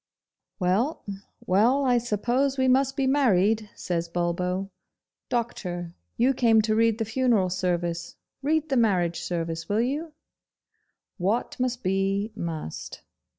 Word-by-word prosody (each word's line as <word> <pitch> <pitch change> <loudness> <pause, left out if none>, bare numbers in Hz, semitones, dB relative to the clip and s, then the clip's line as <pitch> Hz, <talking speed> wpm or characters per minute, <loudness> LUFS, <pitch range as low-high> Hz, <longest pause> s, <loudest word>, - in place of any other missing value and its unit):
'Well, 205 - 0 0.4
well, 240 +9 +3
I 245 -2 +4
suppose 245 +5 0
we 260 0 +2
must 270 +1 +3
be 275 - +1
married,' 220 -6 +2
says 170 -1 -3
Bulbo. 180 +3 -1 0.6
'Doctor, 180 -8 -3 0.2
you 255 +3 +3
came 230 -3 +4
to 215 0 +1
read 225 0 +3
the 225 - -1
Funeral 225 -5 +1
Service 175 -2 -2 0.3
read 310 +2 0
the 270 - +1
Marriage 180 -7 +2
Service, 165 -1 -3
will 210 +2 +2
you? 300 +6 -2 1.1
What 200 +7 0
must 250 -1 -1
be, 195 +3 0
must. 160 - -6
215 Hz, 125 wpm, -26 LUFS, 180-255 Hz, 1.1 s, I